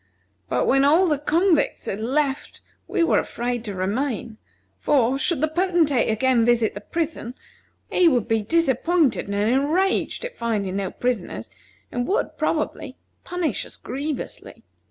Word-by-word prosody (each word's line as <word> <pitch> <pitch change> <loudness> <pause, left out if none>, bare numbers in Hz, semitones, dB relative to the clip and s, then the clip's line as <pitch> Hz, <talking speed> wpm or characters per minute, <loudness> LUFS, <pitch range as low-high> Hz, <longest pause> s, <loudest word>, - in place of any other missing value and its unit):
But 125 - +1
when 270 +1 +4
all 320 +7 +5
the 300 -4 +1
convicts 330 +2 +1
had 195 - -3
left 270 +4 -1 0.3
we 370 -5 +1
were 335 - +3
afraid 240 -1 -3
to 205 -2 -4
remain, 220 +3 -2 0.4
for, 270 -2 +2
should 310 +1 +1
the 310 - +3
Potentate 325 -6 +2
again 235 +2 +2
visit 235 -2 +2
the 205 - -7
prison, 315 -3 -3 0.6
he 360 - +4
would 250 -8 +2
be 225 -1 +1
disappointed 325 - +1
and 200 - -3
enraged 285 - +1
at - - -8
finding 205 -5 -1
no 195 -2 -2
prisoners, 200 - -3 0.4
and 245 0 -2
would, 400 - -1
probably, - - -2 0.3
punish 345 - -2
us - - -10
grievously. 280 +3 -6
265 Hz, 145 wpm, -23 LUFS, 225-320 Hz, 0.6 s, all